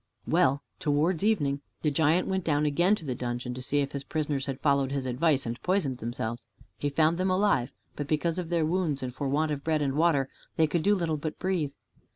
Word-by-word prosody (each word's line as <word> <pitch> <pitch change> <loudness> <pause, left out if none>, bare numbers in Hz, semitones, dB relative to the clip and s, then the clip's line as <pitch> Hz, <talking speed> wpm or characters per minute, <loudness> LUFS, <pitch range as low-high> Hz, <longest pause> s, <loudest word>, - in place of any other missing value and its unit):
Well, 140 +2 +2 0.2
towards 155 +4 +1
evening 145 -10 +1 0.2
the 150 - +2
giant 160 +4 +2
went 190 -1 -1
down 150 -2 +1
again 175 +7 +3
to 165 - -10
the 130 - -1
dungeon 120 0 -3
to 130 - -6
see 145 +3 0
if 140 - -2
his 140 -1 -4
prisoners 145 -2 -2
had 135 -1 -3
followed 140 -2 +2
his 140 -2 -2
advice 135 +3 +1
and 115 +1 -4
poisoned 170 -9 0
themselves. 120 0 -4 0.3
He 145 - 0
found 160 +4 +2
them 185 +1 +1
alive, 185 -10 +2 0.2
but 145 - -4
because 160 +3 0
of 170 -2 -4
their 170 -2 +2
wounds 160 -5 0
and 125 -1 -4
for 140 +1 -3
want 155 +3 +1
of 140 -1 -3
bread 155 -1 +1
and 135 -1 0
water 150 -3 +3 0.3
they 160 - +4
could 155 +2 0
do 205 +4 +4
little 165 -4 -1
but 155 +1 -4
breathe. 175 -7 -1
150 Hz, 220 wpm, -28 LUFS, 135-170 Hz, 0.3 s, they